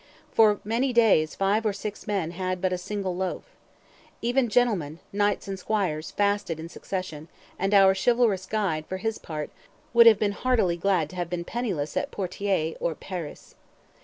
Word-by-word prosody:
For 210 -2 +4
many 240 +5 0
days 205 -10 +4
five 200 +3 +1
or 215 -2 +1
six 210 +2 -7
men 195 -6 -1
had 185 +1 -3
but 185 0 0
a - - 0
"single 190 -1 -3
loaf." 185 0 -3 0.8
Even 245 +1 +1
gentlemen, 205 -11 +1 0.2
knights 205 0 0
and 195 -1 -4
squires, 180 -6 -1
fasted 200 -5 0
in 165 +1 -7
succession; 175 -5 -6 0.3
and 195 +2 0
our 195 -2 +6
chivalrous 210 -2 +2
guide, 185 -8 -1
for 185 - -4
his 225 +3 -3
part, 150 -2 -6 0.4
"would 235 0 +8
have 220 -3 +8
been 205 0 +1
heartily 220 -5 +1
glad 175 -2 +1
to 185 - -10
have 175 -2 -2
been 175 -1 -3
penniless 185 -9 -3
at - - -1
Poitiers 185 -3 -2
or 165 - -1
Paris." 175 -4 -7
195 Hz, 170 wpm, -26 LUFS, 175-215 Hz, 0.8 s, would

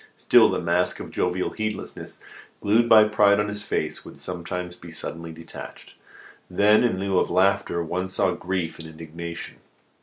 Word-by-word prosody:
Still, - - +6
the - - -1
mask 85 +1 0
of - - -8
jovial 90 +1 -1
heedlessness 110 -1 -5 0.4
glued 115 +3 +3
by 110 -1 +9
pride 105 -1 +4
on 105 0 0
his 105 0 -4
face 105 - -3
would - - -12
sometimes 90 0 -5
be 85 -1 -12
suddenly 85 0 -5
detached. 80 +1 -11 0.6
Then, 105 +4 +4
in 120 -6 +1
lieu 95 -1 +1
of - - 0
laughter, 95 -1 +2
one 90 +3 -2
saw 95 - +1
grief 90 -3 -3
and 80 - -7
indignation. 85 +1 -8
90 Hz, 160 wpm, -24 LUFS, 85-105 Hz, 0.6 s, by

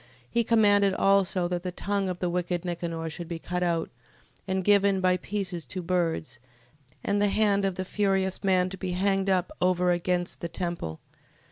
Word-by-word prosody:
He 235 0 +1
commanded 205 -3 +4
also, 195 -2 +2
that 175 -1 -2
the 180 0 -4
tongue 200 +1 -1
of 180 - -3
the 180 0 -1
wicked 175 0 -2
Nicanor 170 -2 -3
should 165 +2 -6
be 170 -1 -4
cut 180 +2 -4
out, 170 -2 0 0.6
and 190 0 -1
given 200 -1 +4
by 185 -1 +3
pieces 180 -7 -4
to 185 +5 -5
birds, 165 -8 -1 0.6
and 205 0 +1
the 205 - +4
hand 200 -1 +2
of 190 -2 -1
the 185 - -3
furious 195 -1 0
man 185 -1 +3
to 190 - -6
be 185 -2 -3
hanged 195 +1 +1
up 185 -2 +1
over 180 0 +3
against 175 0 -1
the 170 - -3
temple. 170 - -4
185 Hz, 180 wpm, -27 LUFS, 175-195 Hz, 0.6 s, commanded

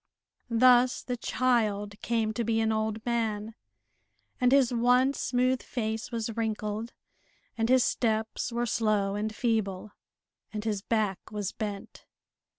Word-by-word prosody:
Thus 245 +1 +4
the 250 - -3
child 215 -5 0
came 225 -2 0
to 235 - -1
be 225 0 +1
an 220 0 +1
old 220 0 -2
man, 225 -2 -1 0.9
and 250 0 +3
his 265 -3 +4
once 250 +3 +3
smooth 255 +1 +1
face 220 -1 -4
was 230 -1 -3
wrinkled, 220 0 -3 0.6
and 225 0 0
his 255 -1 +5
steps 220 0 -1
were 240 +1 -1
slow 210 -3 +1
and 210 +1 -2
feeble, 215 -4 -1 0.6
and 210 -1 -4
his 210 -3 -1
back 210 -3 0
was 205 -3 -3
bent. 205 -2 -6
225 Hz, 135 wpm, -28 LUFS, 215-240 Hz, 0.9 s, his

